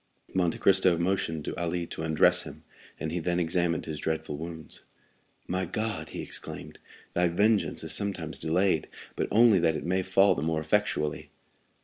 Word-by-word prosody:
Monte 90 -3 +1
Cristo 95 -3 +4
motioned 85 -3 -1
to - - -4
Ali 85 0 -1
to 80 - -7
undress 80 -1 +4
him, - - -10 0.4
and 80 - -3
he 90 - -1
then 85 +1 0
examined 85 -1 0
his 75 -2 -5
dreadful 80 -1 -2
wounds. 80 +1 -6 0.6
"My 95 +1 -1
God!" 110 +5 -3
he - - -6
exclaimed, - - -6 0.3
"thy 90 0 +2
vengeance 105 +5 +1
is - - +2
sometimes 90 -6 -1
delayed, 85 +1 +1 0.3
but - - -1
only 110 -3 +5
that 80 -2 +2
it - - -4
may 95 +2 +1
fall 95 +2 +4
the - - -4
more 80 0 0
effectually." 80 -2 -1
85 Hz, 165 wpm, -28 LUFS, 80-95 Hz, 0.6 s, only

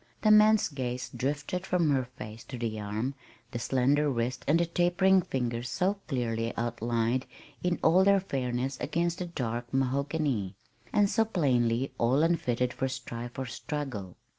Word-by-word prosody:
The 215 - +5
man's 215 0 +6
gaze 125 -4 -4
drifted 145 +6 -2
from 175 -5 +2
her 130 -2 +1
face 110 -3 -10
to 130 - -7
the 115 -2 -3
arm, 105 +6 -2 0.4
the 120 - -3
slender 135 +5 +2
wrist 125 0 -2
and 160 +3 +4
the 170 - +3
tapering 175 +3 +3
fingers 120 -5 -2
so 190 +8 0
clearly 115 -4 -2
outlined 120 +1 -1 0.3
in 180 -1 0
all 180 +4 +6
their 200 0 +5
fairness 130 -6 -2
against 170 +2 -1
the 180 - -3
dark 120 -6 -4
mahogany, 135 - 0 0.4
and 205 -1 +4
so 225 +3 +2
plainly 130 - +1
all 130 +6 +3
unfitted 125 -7 +1
for 130 - -1
strife 120 -1 -6
or 130 - -2
struggle. 125 - -5
130 Hz, 155 wpm, -29 LUFS, 120-170 Hz, 0.4 s, man's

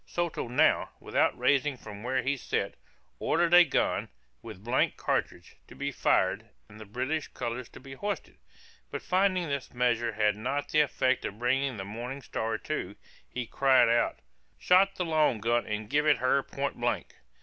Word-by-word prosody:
Soto 170 -7 -2
now, 120 - +3
without - - +1
rising 140 -1 +2
from 105 -3 -10
where 130 +1 -1
he 135 +3 +1
sat, 135 - -2 0.5
ordered 170 +1 +1
a 175 0 +10
gun, 155 - 0 0.3
with 95 - -10
blank 120 +3 +1
cartridge, - - -2
to - - -13
be - - -3
fired, - - +1 0.2
and 105 - -14
the 110 - -9
British 130 +8 -2
colors 120 +1 -5
to - - -13
be 135 +1 -11
hoisted: 205 +10 -5 0.5
but - - -6
finding 185 -2 +1
this 140 -3 -4
measure 120 -2 +1
had 105 -1 +2
not 135 +7 -3
the 155 - +4
effect 130 -2 +1
of 100 - -5
bringing 130 +1 0
the 95 - -5
Morning 120 +6 -6
Star 110 -1 -2
to, 100 -7 -4 0.3
he 125 -1 -4
cried 130 -1 +4
out, 120 0 +2 0.4
"Shot 195 +2 +4
the 180 - -2
long 155 -8 +2
gun 120 +2 +1
and 105 0 -3
give 150 +5 +1
it 145 -3 +5
her 130 +3 +2
point 140 +1 -4
blank." 120 0 -2
130 Hz, 175 wpm, -29 LUFS, 115-150 Hz, 0.5 s, a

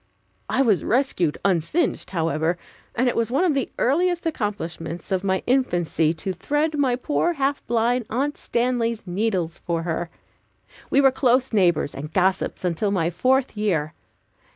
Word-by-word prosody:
I 270 - +2
was 215 -7 +2
rescued 225 - +1
unsinged, 190 - 0
however, 165 -1 0 0.4
and 250 +2 +2
it 245 - +1
was 230 0 +1
one 275 +8 +1
of 350 -5 +3
the 275 -3 -1
earliest 345 +7 +1
accomplishments 175 - -4
of 190 0 0
my 190 -1 0
infancy 175 - +1
to 190 +3 -4
thread 295 - -1
my 270 -4 +2
poor, 300 +6 0
half 280 -2 -1
blind 235 +1 +1
Aunt 280 +6 -1
Stanley's 235 -2 -1
needles 180 -3 -1
for 165 -1 -2
her. 170 0 -2 0.8
We 275 - +4
were 270 -1 +6
close 255 -1 +2
neighbors 175 -8 +2
and 150 +3 -7
gossips 185 +1 0
until 180 +4 0
my 175 -4 0
fourth 255 +8 +1
year. 170 -8 0
215 Hz, 155 wpm, -23 LUFS, 175-265 Hz, 0.8 s, were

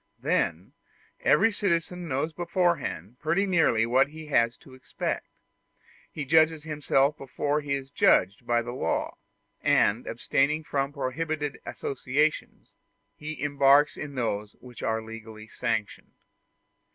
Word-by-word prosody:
Then - - -1 0.5
every 225 - +4
citizen 180 -3 -1
knows 150 +3 -1
beforehand 170 - -1
pretty 170 +6 +1
nearly 165 - +3
what 130 +4 +3
he 155 +2 -10
has 115 -4 +2
to 130 - -17
expect. 130 - -4 0.8
He 150 - -5
judges 160 +1 +4
himself 150 -2 +1
before 145 +2 -1
he 145 -1 -2
is 135 0 -7
judged 105 -1 +3
by 120 0 +2
the 120 - -5
law, 125 - -2 0.4
and, - - +2
abstaining 150 +3 0
from 140 -1 -1
prohibited 145 +2 -3
associations, 140 +3 -2 0.4
he 155 +1 -7
embarks 145 0 +4
in 145 -2 -7
those 105 -4 -2
which 125 -2 -13
are 110 0 -1
legally 110 -1 -10
sanctioned. 110 -3 -3
140 Hz, 125 wpm, -27 LUFS, 120-155 Hz, 0.8 s, every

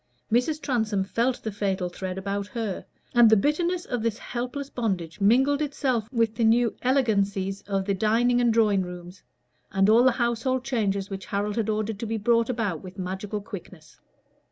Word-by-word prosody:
Mrs. 250 +7 +2
Transome 220 -8 0
felt 235 +6 -1
the 220 - -3
fatal 195 -3 -1
thread 185 +1 -5
about 200 +1 -3
her, 220 -5 -4 0.3
and 240 -2 +7
the 220 - +6
bitterness 340 - 0
of 245 -2 -3
this 230 -1 -1
helpless 250 +4 -5
bondage 190 -7 -3
mingled 265 +8 +4
itself 260 -6 -1
with 230 -3 +1
the 230 - -1
new 230 +1 +3
elegancies 200 -7 +1
of 195 -1 -1
the 200 - +1
dining 230 +5 +2
and 240 -1 +3
drawing 215 -4 +3
rooms, 180 0 -8 0.5
and 195 +2 +3
all 230 +2 +6
the 260 -1 +5
household 245 +1 0
changes 200 -7 -1
which 195 0 -6
Harold 205 +1 -2
had 220 -2 -1
ordered 215 -1 -2
to 230 - -4
be 225 +1 -1
brought 230 +2 +2
about 220 -9 -2
with 185 0 -11
magical 190 +3 -4
quickness. 185 -5 -11
220 Hz, 180 wpm, -26 LUFS, 195-240 Hz, 0.5 s, and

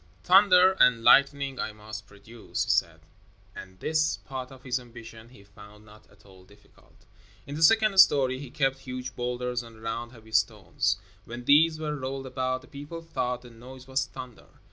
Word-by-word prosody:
"Thunder 185 0 +6
and 120 -2 +4
lightning 140 0 +4
I 110 - -3
must 110 0 -10
produce," 110 +3 -6
he - - +1
said, 85 -1 0 0.5
and 95 -1 -11
this 155 +4 0
part 130 -1 -8
of 130 -1 -14
his 125 0 -2
ambition 115 -2 -13
he 110 -5 -17
found 105 +1 -16
not 105 0 -18
at 100 0 -24
all 95 -2 -17
difficult. 100 +2 -24 0.4
In 140 - -8
the 155 - -5
second 215 +2 +4
story 130 -7 +5
he 140 -2 -9
kept 135 -1 -1
huge 125 -1 -7
boulders 125 0 -3
and 115 -2 -14
round 115 +1 -5
heavy 110 -3 -16
stones. 105 -6 0 0.3
When 120 +1 -9
these 155 +3 +4
were 150 -1 -3
rolled 135 -1 -5
about 130 0 -3
the - - -16
people 150 +4 -9
thought 125 -6 -3
the 120 - -13
noise 125 +3 -13
was 130 0 -1
thunder. 130 -3 -11
125 Hz, 180 wpm, -27 LUFS, 110-140 Hz, 0.5 s, Thunder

